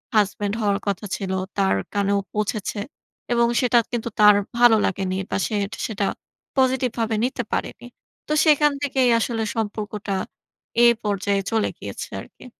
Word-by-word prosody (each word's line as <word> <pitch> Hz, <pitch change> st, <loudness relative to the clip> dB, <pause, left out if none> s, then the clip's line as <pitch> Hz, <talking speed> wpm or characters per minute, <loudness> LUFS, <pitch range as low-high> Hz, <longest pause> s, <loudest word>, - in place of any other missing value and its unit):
Husband 205 Hz, 0 st, +1 dB
হওয়ার 200 Hz, -1 st, +1 dB
কথা 200 Hz, +1 st, -1 dB
ছিল 190 Hz, -1 st, -4 dB, 0.3 s
তার 195 Hz, -, +3 dB, 0.2 s
কানেও 200 Hz, 0 st, +1 dB
পৌঁছেছে। 210 Hz, 0 st, -2 dB, 0.5 s
এবং 235 Hz, 0 st, +3 dB
সেটা 245 Hz, -1 st, +4 dB
কিন্তু 235 Hz, -1 st, -2 dB
তার 210 Hz, -1 st, +8 dB, 0.2 s
ভালো 240 Hz, -1 st, +7 dB
লাগেনি 190 Hz, -1 st, -1 dB, 0.2 s
বা -, -, +1 dB
সেট 205 Hz, -2 st, -2 dB, 0.2 s
সেটা 205 Hz, -3 st, -2 dB, 0.5 s
পজিটিভ 260 Hz, -1 st, +3 dB
ভাবে 225 Hz, -1 st, 0 dB
নিতে 250 Hz, -1 st, -2 dB
পারেনি। -, -, -3 dB, 0.4 s
তো 305 Hz, -, 0 dB
সেখান 295 Hz, -1 st, +5 dB
থেকেই 265 Hz, -3 st, +2 dB
আসলে 225 Hz, -1 st, -1 dB
সম্পর্কটা 210 Hz, -2 st, -3 dB, 0.7 s
এই 235 Hz, -, +8 dB
পর্যায়ে 200 Hz, -1 st, 0 dB
চলে 220 Hz, -1 st, +1 dB
গিয়েছে -, -, -7 dB
আর -, -, -12 dB
কি। -, -, -14 dB
215 Hz, 150 wpm, -23 LUFS, 200-240 Hz, 0.7 s, তার